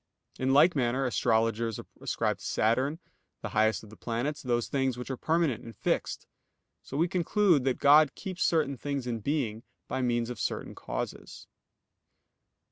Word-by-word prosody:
In 130 0 +1
like 150 +6 +6
manner 130 0 +1
astrologers 115 -2 +1 0.2
ascribe - - -1
to - - -13
Saturn, 130 +7 +1 0.5
the - - -3
highest 110 0 +2
of 105 - -13
the - - -11
planets, 120 +7 -3
those 120 -2 0
things 135 -3 0
which 125 +2 -5
are - - -2
permanent 155 -5 0
and 115 -2 -10
fixed. - - -1 0.6
So 135 - -7
we 165 +3 +3
conclude 180 -4 +2
that 130 -2 +1
God 145 0 +6
keeps 185 -2 -6
certain 150 -5 +2
things 140 0 -3
in 120 -2 -2
being, 115 -4 -1 0.3
by 130 - -2
means 120 -1 0
of 120 - -7
certain - - -3
causes. - - -6
130 Hz, 160 wpm, -29 LUFS, 115-145 Hz, 0.6 s, like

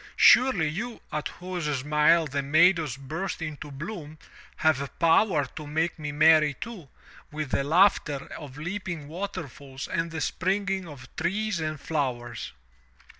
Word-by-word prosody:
Surely 255 -12 +6
you 220 +10 -4
at 150 0 -2
whose 180 -2 -5 0.2
smile 150 +3 +4
the 140 -1 -2
meadows 155 -1 +3
burst 155 +8 -4
into 155 -2 -6
bloom, 155 +1 -7 0.4
have 140 -3 +1
power 165 -2 +4
to 150 - -9
make 160 +3 -1
me 150 -1 -4
merry 155 -1 +5
too, 195 - -8 0.4
with 150 -2 -4
the 140 - +1
laughter 150 -3 +3
of 145 -3 -9
leaping 175 -2 -5
waterfalls 150 -6 -6
and 170 -2 -1
the 165 -1 -5
springing 190 +3 -1
of 135 -5 -11
trees 200 +3 -1
and 155 -1 -3
flowers." 120 -7 -3
155 Hz, 135 wpm, -27 LUFS, 145-180 Hz, 0.4 s, Surely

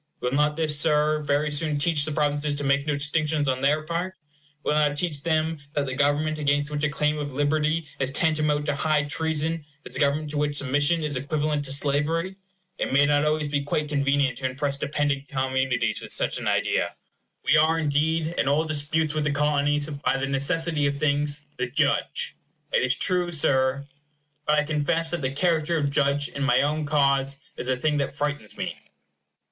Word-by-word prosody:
Will 125 - -2
not 150 +2 +2
this, 155 -2 +1
Sir, 150 0 +2
very 145 +1 0
soon 150 0 +1
teach 145 -1 +1
the 155 - -3
provinces 145 -1 0
to 145 - -4
make 140 +1 +1
no 150 - +1
distinctions 150 0 0
on 130 -1 0
their 150 +3 +2
part? 170 +4 -3 0.5
Will - - 0
it 150 - +3
not 145 -1 +1
teach 150 -4 -1
them 160 0 0 0.2
that 145 -1 +1
the 130 - -4
government, 145 +3 +1
against 145 0 +1
which 150 0 -3
a 150 - +3
claim 150 0 0
of 145 -2 -4
liberty 150 +3 0
is 130 -1 +1
tantamount 150 0 +1
to 145 - 0
high 150 +1 +1
treason, 160 +2 -1 0.2
is - - -3
a - - 0
government 145 +1 +1
to 150 - -2
which 145 0 0
submission 145 +4 +1
is 145 -3 -1
equivalent 150 +2 -1
to 135 - -4
slavery? 150 +6 0 0.4
It - - -1
may 140 +2 +5
not 145 0 +2
always 150 0 0
be 145 -1 0
quite 150 +1 -2
convenient 140 -3 +1
to 130 - 0
impress 140 +2 -2
dependent 145 -1 -1
communities 130 -2 0
with - - -6
such - - +1
an - - -4
idea. - - 0 0.5
We - - +4
are, 160 +2 +4
indeed, 155 +1 +1
in - - +1
all 150 +3 +2
disputes 155 0 -1
with 155 -1 -1
the - - +2
Colonies, 145 0 +1
by 145 -2 -1
the 135 - -1
necessity 150 +2 +1
of 140 0 -2
things, 145 0 0
the 125 - -1
judge. - - 0 0.4
It - - +3
is 130 0 +2
true, 180 +2 +1
Sir. 140 -3 +1 0.6
But 150 0 +3
I 150 - +3
confess 160 +2 0
that 175 -2 -2
the 130 - 0
character 165 +2 +1
of 145 -2 0
judge 140 0 +1
in 140 - -7
my 130 -2 +3
own 150 +1 -1
cause 140 -2 +1
is 125 - -3
a 130 - +1
thing 150 +3 0
that 140 -1 -2
frightens 145 -7 -3
me. - - -3
145 Hz, 200 wpm, -25 LUFS, 140-155 Hz, 0.6 s, may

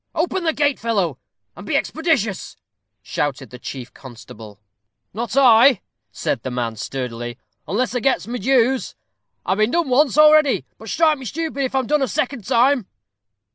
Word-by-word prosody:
"Open 345 +2 -1
the 320 - +3
gate, 290 -2 +1
fellow, 195 - -1 0.4
and - - -10
be - - -2
expeditious," 290 - -1 0.5
shouted 135 -4 -3
the 125 - -10
chief 130 -1 -8
constable. 110 -5 -12 0.5
"Not 230 +4 -4
I," 250 -3 +6 0.3
said 115 - -2
the 130 - -5
man, 120 -2 -3
sturdily, 120 0 -5 0.3
"unless 230 +11 -1
I 250 - 0
gets 265 +3 +1
my 245 +2 -5
dues. 260 0 +1 0.5
I've 190 +2 0
been 215 +1 +3
done 335 +1 0
once 280 +2 +3
already. 305 -2 +5
But 220 - -10
strike 310 +1 +2
me 260 - -9
stupid 285 +2 -3
if 260 - -4
I'm 265 -1 +1
done 300 +3 +1
a 270 - +1
second 245 +1 -3
time." 250 -2 +2
240 Hz, 165 wpm, -20 LUFS, -, 0.5 s, I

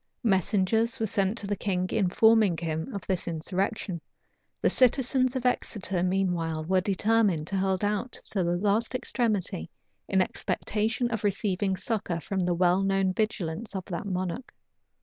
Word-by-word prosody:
Messengers 210 +2 +2
were 225 - +1
sent 200 0 0
to 210 - -4
the 205 +1 -1
king, 185 -3 -1
informing 215 -1 +4
him 160 -1 -3
of 200 -2 -6
this 185 -3 -1
insurrection: 180 +2 -2 0.6
the - - +2
citizens 255 0 +3
of 255 -1 -3
Exeter 195 -7 0
meanwhile 175 -4 0
were 185 +2 +2
determined 200 -4 +2
to 195 +4 -2
hold 190 0 0
out 210 +4 -1 0.2
to 195 -3 0
the 175 +1 +1
last 210 +6 +1
extremity, 215 - -1 0.4
in 190 - +2
expectation 220 +5 -1
of 225 -2 -2
receiving 195 -1 0
succor 185 -4 -2
from 190 +4 -3
the 180 -1 +1
well 180 +2 +3
known 195 -1 +1
vigilance 210 -1 -2
of 190 -1 -4
that 180 +2 -5
monarch. 185 +6 -4
195 Hz, 150 wpm, -27 LUFS, 180-220 Hz, 0.6 s, informing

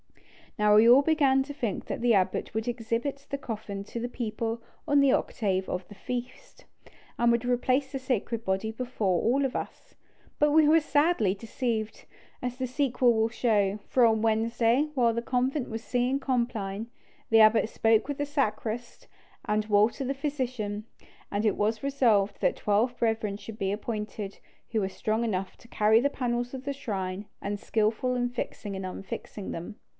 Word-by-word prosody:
Now 210 0 +4
we 220 +2 +7
all 260 +4 +8
began 280 -4 +3
to 285 +1 -8
think 235 -7 -3
that - - -4
the 240 -1 +4
abbot 185 -2 0
would 220 +1 -2
exhibit 240 +4 -2
the 280 - -2
coffin 210 -6 -5
to 235 - -6
the 240 - -3
people 230 -1 -3 0.3
on 290 -1 +4
the 280 -1 +5
octave 190 -4 0
of 180 0 -3
the 205 - -12
feast, 250 +4 -7 0.5
and 235 0 +4
would 235 +1 +1
replace 255 +2 +1
the 270 - -3
sacred 235 -3 -2
body 195 +3 -1
before 220 -6 -1
all 270 +5 +2
of 265 - -3
us. - - -6 0.4
But 295 0 +4
we 310 0 +5
were 320 +2 +6
sadly 290 - +2
deceived, 225 0 -3 0.4
as 250 0 -3
the 260 -1 -2
sequel 255 -2 +2
will 220 0 +2
show; 215 -4 +1
for 250 -2 +4
on 220 -1 +3
Wednesday, 230 +5 +2
while 235 -3 +3
the 235 - -1
convent 255 +3 -1
was 225 0 -5
singing 250 +2 0
compline, 230 -6 -2 0.4
the 225 - +6
abbot 215 0 +5
spoke 225 +1 +2
with 285 -1 -3
the 290 - -1
sacrist 240 -4 -3 0.4
and 210 0 0
Walter 215 +5 +3
the 270 +1 -1
physician, 255 -7 -3 0.5
and 205 +2 -1
it 210 - +3
was 215 +3 0
resolved 235 -8 +2
that - - +2
twelve 225 +4 +1
brethren 220 -3 0
should 210 +1 -10
be 195 0 0
appointed 210 -1 -4 0.3
who 220 -2 +1
were 190 - -1
strong 215 +3 -1
enough 195 -4 -2
to - - -18
carry 220 +1 +4
the 280 - +2
panels 245 -2 -2
of 265 0 -7
the 280 - -1
shrine, 195 -6 -4 0.2
and 205 0 -3
skilful 220 +4 0
in 245 0 +1
fixing 210 -4 -5
and 190 0 -4
unfixing 195 +2 -6
them. 175 +6 -6
230 Hz, 180 wpm, -28 LUFS, 210-255 Hz, 0.5 s, all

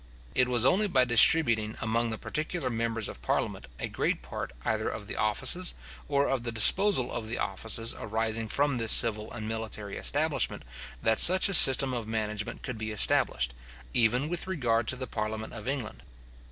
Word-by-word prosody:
It 125 - +2
was 125 -1 +1
only 205 +9 +2
by 130 -9 +2
distributing 115 -3 +5
among 115 +1 -2
the 110 - -5
particular 155 -1 -4
members 115 -1 -3
of - - -10
parliament - - -3
a - - -5
great - - -3
part - - -7
either 110 0 -1
of 105 - -8
the - - -7
offices, 130 - +1 0.3
or 140 0 0
of 135 -2 -2
the 120 0 -4
disposal 130 - +2
of 110 - -6
the 120 - -4
offices 115 +4 -1
arising 110 +1 -4
from 140 +2 -1
this 115 -1 +3
civil 110 -2 +5
and 110 -2 -7
military 110 -2 -6
establishment, 155 0 -1 0.4
that 110 0 +1
such 185 +3 +7
a - - -2
system 135 -5 +6
of 115 -3 -5
management 105 -1 -5
could 125 -5 -6
be 110 0 -5
established, 65 - +2 0.4
even 120 +5 +1
with 175 +2 -3
regard 120 - -1
to - - -2
the 130 0 -6
parliament 110 -1 -5
of 105 -1 -9
England. 135 -5 -5
115 Hz, 180 wpm, -27 LUFS, 110-135 Hz, 0.4 s, such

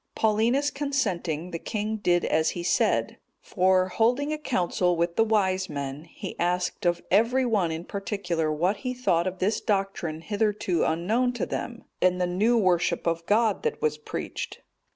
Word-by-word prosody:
Paulinus 230 +7 +2
consenting, 185 - -2
the 165 - -4
king 215 +3 -3
did 175 -4 +2
as 160 0 +2
he 175 - -3
said; - - +1 0.2
for, 185 0 +2
holding 245 +10 +1
a - - -2
council 180 - 0
with 170 0 0
the 225 - +4
wise 190 -4 +1
men,(230) 140 +1 -5
he - - -8
asked 180 +1 0
of 175 0 0
every 230 +6 +3
one 210 -8 +1
in 160 +1 -4
particular 185 -6 -2
what 175 +7 +1
he 255 +2 -4
thought 185 -8 +1
of 185 0 -3
this 200 +4 0
doctrine 195 -6 -1
hitherto 205 -3 0
unknown 220 +10 +1
to 245 - -2
them, 235 -1 -5 0.2
and 180 0 +3
the 180 - +2
new 210 +7 +2
worship 175 -4 +1
of 170 0 0
God 215 -1 +2
that - - -2
was 150 0 0
preached? - - -6
185 Hz, 170 wpm, -26 LUFS, 170-220 Hz, 0.2 s, the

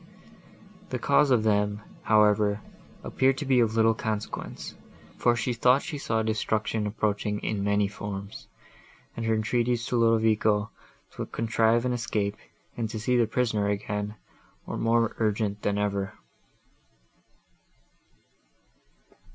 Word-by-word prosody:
The - - -2
cause 150 - +3
of 120 -4 +3
them, 105 -1 +1 0.2
however, 105 -1 +3 0.4
appeared 135 0 +1
to 150 - -4
be 130 -2 +3
of 115 -2 +2
little 115 0 +4
consequence, 110 -1 -5 0.4
for 120 - +2
she 120 +1 -1
thought 125 +3 +3
she 145 - -5
saw 110 -4 0
destruction 110 0 -1
approaching 105 0 -1
in 105 -2 -2
many 100 0 +2
forms, 100 0 -7 0.7
and 115 -1 -3
her 110 - +3
entreaties 120 +2 0
to 125 - -1
Ludovico 110 -2 +2 0.5
to - - -4
contrive 115 +1 +1
an 125 - +1
escape 105 -3 -1 0.4
and 115 -2 -2
to 110 -1 -5
see 125 +4 +1
the 120 -2 +3
prisoner 110 -3 0
again, 105 +1 -3 0.5
were - - -5
more 115 0 +1
urgent 105 -2 0
than 100 0 0
ever. 100 -1 -1
110 Hz, 125 wpm, -27 LUFS, 105-115 Hz, 0.7 s, little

